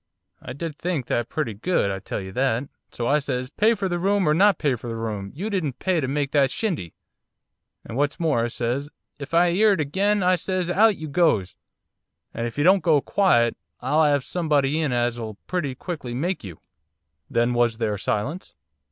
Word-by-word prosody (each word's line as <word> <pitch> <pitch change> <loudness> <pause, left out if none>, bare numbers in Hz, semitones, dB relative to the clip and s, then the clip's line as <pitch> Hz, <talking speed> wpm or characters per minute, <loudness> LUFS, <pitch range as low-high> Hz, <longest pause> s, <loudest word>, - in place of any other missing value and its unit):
I 125 - -7
did 150 +1 -6
think 170 -7 -2
that 120 -1 -1
pretty 135 -8 -2
good, 105 - 0
I 95 - -3
tell - - -5
you 95 0 -7
that. 125 +2 0 0.3
So 120 - -4
I 145 +5 +3
says, 130 -2 -3
"Pay 220 +6 +3
for 200 -2 -2
the 175 -1 -2
room 195 0 +2
or 150 - +4
not 200 +4 +4
pay 145 -4 +1
for 120 0 -6
the 115 - -4
room, 105 -3 -4
you 190 +8 -4
didn't 155 -10 -2
pay 185 -4 0
to 130 - -1
make 140 +1 -1
that 140 -2 +3
shindy!" 160 - -3 0.9
And 115 - -7
what's 145 +5 0
more 155 -9 +1
I - - +1
says, 125 +4 -2 0.3
"If 145 +3 -5
I 175 +1 +5
'ear 210 +4 +4
it 190 - -2
again," 195 +7 +1
I 180 0 +4
says, 185 -1 -2
"out 210 +2 +4
you 155 - -6
goes! 140 - +1 0.8
And 115 +1 -2
if 115 - -9
you 145 - +2
don't 190 +3 +5
go 160 -2 +4
quiet 125 - +2 0.2
I'll 140 +5 +1
'ave 145 -3 +3
somebody 150 -3 0
in 150 -4 0
as'll 120 -3 -1
pretty 155 -8 -2
quickly 130 -6 -6
make 170 +4 -2
you!"' 90 -6 -9 0.7
'Then 120 +1 +1
was 120 -2 +2
there 105 -3 -1
silence? 135 - -3
145 Hz, 205 wpm, -24 LUFS, 120-175 Hz, 0.9 s, I